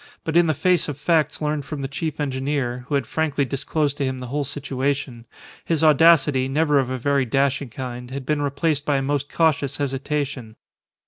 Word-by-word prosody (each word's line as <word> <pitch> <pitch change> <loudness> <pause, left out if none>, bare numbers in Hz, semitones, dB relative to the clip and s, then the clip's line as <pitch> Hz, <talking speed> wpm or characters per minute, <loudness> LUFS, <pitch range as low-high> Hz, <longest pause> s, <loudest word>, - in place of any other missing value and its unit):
But 160 - -3
in 175 -1 +5
the 155 - +1
face 180 +2 +2
of 145 - -5
facts 155 0 +1
learned 150 -1 -1
from 145 0 -6
the 135 - -2
chief 150 +3 -4
engineer 130 -3 -2
(who 145 - -1
had 140 -3 0
frankly 145 0 0
disclosed 145 +2 -1
to - - +1
him 130 -1 -1
the 125 -1 -7
whole 145 0 0
situation) 135 -3 -3 0.4
his 160 -2 0
audacity, 150 -4 +5
never 145 +1 +2
of 130 -2 -1
a 130 - -2
very 140 +2 +1
dashing 135 +2 0
kind, 125 0 -6
had 135 0 -6
been 150 +1 0
replaced 145 +1 0
by 145 -1 +1
a 135 - -1
most 145 0 -2
cautious 145 -4 +1
hesitation. 135 -4 -3
140 Hz, 195 wpm, -22 LUFS, 130-150 Hz, 0.4 s, in